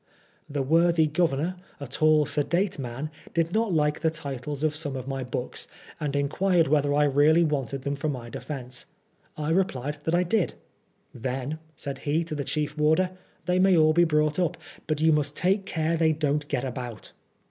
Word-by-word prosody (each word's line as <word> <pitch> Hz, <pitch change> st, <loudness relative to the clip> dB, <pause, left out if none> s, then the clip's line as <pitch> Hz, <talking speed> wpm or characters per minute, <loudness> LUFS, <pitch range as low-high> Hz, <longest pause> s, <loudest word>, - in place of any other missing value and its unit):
The 140 Hz, -1 st, -1 dB
worthy 165 Hz, +3 st, +4 dB
Governor, 160 Hz, +2 st, 0 dB, 0.2 s
a 140 Hz, -, -5 dB
tall 155 Hz, +3 st, +3 dB
sedate 170 Hz, +6 st, 0 dB
man, 135 Hz, +4 st, -4 dB, 0.2 s
did 165 Hz, +1 st, +1 dB
not 220 Hz, -1 st, +1 dB
like 150 Hz, -2 st, +2 dB
the 160 Hz, -, +2 dB
titles 145 Hz, -2 st, -5 dB
of 155 Hz, -1 st, +1 dB
some 150 Hz, -3 st, -4 dB
of 130 Hz, 0 st, -5 dB
my 135 Hz, -1 st, -3 dB
books, 125 Hz, 0 st, -4 dB, 0.3 s
and 145 Hz, -3 st, -2 dB
inquired 165 Hz, +4 st, +2 dB
whether 145 Hz, 0 st, +2 dB
I 150 Hz, -, +4 dB
really 145 Hz, +4 st, +5 dB
wanted 140 Hz, -3 st, -1 dB
them 140 Hz, -, -1 dB
for 145 Hz, +2 st, -2 dB
my 125 Hz, -5 st, -4 dB
defence. 125 Hz, +1 st, -6 dB, 0.5 s
I 155 Hz, +1 st, -1 dB
replied 150 Hz, -5 st, 0 dB
that 165 Hz, -, +2 dB
I 180 Hz, -, +3 dB
did. 180 Hz, +1 st, 0 dB, 0.3 s
" -, -, -42 dB
Then," 130 Hz, +5 st, -3 dB, 0.2 s
said 140 Hz, -1 st, -5 dB
he 150 Hz, +4 st, 0 dB
to 165 Hz, -1 st, -6 dB
the 145 Hz, -2 st, -2 dB
chief 150 Hz, +1 st, -2 dB
warder, 160 Hz, +5 st, +3 dB, 0.2 s
" -, -, -36 dB
they 180 Hz, +1 st, +2 dB
may 190 Hz, -1 st, +5 dB
all 155 Hz, 0 st, +5 dB
be 175 Hz, +2 st, +5 dB
brought 150 Hz, 0 st, +2 dB
up, 175 Hz, -1 st, 0 dB, 0.3 s
but 155 Hz, -1 st, 0 dB
you 160 Hz, +1 st, +4 dB
must 150 Hz, -1 st, +1 dB
take 195 Hz, +2 st, +1 dB
care 160 Hz, 0 st, 0 dB
they 160 Hz, -1 st, +3 dB
don't 150 Hz, -1 st, 0 dB
get 135 Hz, -3 st, -1 dB
about." 125 Hz, -4 st, -6 dB
150 Hz, 190 wpm, -26 LUFS, 140-165 Hz, 0.5 s, really